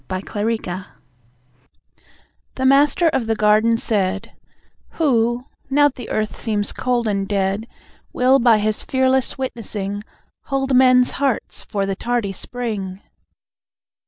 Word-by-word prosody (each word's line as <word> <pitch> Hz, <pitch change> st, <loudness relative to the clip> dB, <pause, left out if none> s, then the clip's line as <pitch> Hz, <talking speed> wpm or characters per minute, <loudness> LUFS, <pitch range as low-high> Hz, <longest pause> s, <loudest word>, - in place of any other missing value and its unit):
The 185 Hz, 0 st, -4 dB, 0.2 s
Witness 200 Hz, -4 st, -3 dB, 1.7 s
The 260 Hz, -, -2 dB
Master 285 Hz, +5 st, +4 dB
of 245 Hz, -7 st, -1 dB
the 225 Hz, -, +1 dB
Garden 215 Hz, +2 st, +3 dB
said; 200 Hz, -4 st, -2 dB, 0.6 s
"Who, 240 Hz, -5 st, +1 dB, 0.2 s
now 290 Hz, +1 st, +4 dB
the 255 Hz, -3 st, -10 dB
Earth 215 Hz, 0 st, -2 dB
seems 205 Hz, -3 st, -1 dB
cold 245 Hz, -2 st, -1 dB
and 200 Hz, -2 st, -1 dB
dead, 200 Hz, +2 st, -1 dB, 0.4 s
Will 260 Hz, +2 st, +3 dB
by 235 Hz, -2 st, +5 dB
his 215 Hz, 0 st, 0 dB
fearless 260 Hz, 0 st, +1 dB
witnessing 210 Hz, -6 st, -4 dB, 0.4 s
Hold 270 Hz, -1 st, 0 dB
men's 250 Hz, -1 st, +5 dB
hearts 275 Hz, -4 st, -2 dB
for 200 Hz, -1 st, -2 dB
the 195 Hz, 0 st, -2 dB
tardy 235 Hz, -1 st, -1 dB
spring?" 205 Hz, -4 st, -5 dB
230 Hz, 120 wpm, -20 LUFS, 205-260 Hz, 1.7 s, by